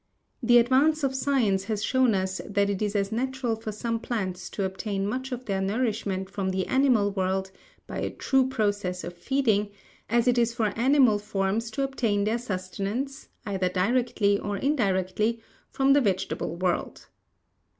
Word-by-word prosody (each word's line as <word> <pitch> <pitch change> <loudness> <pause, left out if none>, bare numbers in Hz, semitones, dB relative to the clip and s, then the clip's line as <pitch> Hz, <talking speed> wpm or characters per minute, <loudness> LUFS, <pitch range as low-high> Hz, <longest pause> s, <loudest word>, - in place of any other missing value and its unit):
The 240 0 +5
advance 275 +6 +3
of 270 -1 +1
science 245 -8 +1
has 215 -2 -2
shown 260 -4 +3
us 190 0 -2
that 200 0 0
it 195 - -3
is 210 0 -1
as 200 0 0
natural 255 0 -1
for 220 -1 -6
some 230 +2 -2
plants 190 -6 -3
to 200 - -3
obtain 195 +1 -2
much 260 +6 -3
of 250 0 -5
their 195 -2 -1
nourishment 205 -2 -1
from 195 -1 -3
the 190 0 -1
animal 255 -7 +3
world, 190 0 -1 0.3
by - - -5
a - - -1
true 265 -1 +1
process 205 -6 -1
of 175 - -6
feeding, 215 0 +1 0.4
as 235 +2 +2
it 245 -1 +4
is 235 0 +1
for 220 -4 0
animal 250 -3 +4
forms 205 +2 -1
to 275 +4 -2
obtain 230 -7 0
their 220 +3 0
sustenance, 210 +6 -4 0.2
either 190 -3 0
directly 205 +1 +1
or 205 -1 -3
indirectly, 215 -3 0 0.3
from 270 0 +3
the 285 - +5
vegetable 190 -5 -1
world. 180 0 -2
215 Hz, 165 wpm, -26 LUFS, 195-250 Hz, 0.4 s, The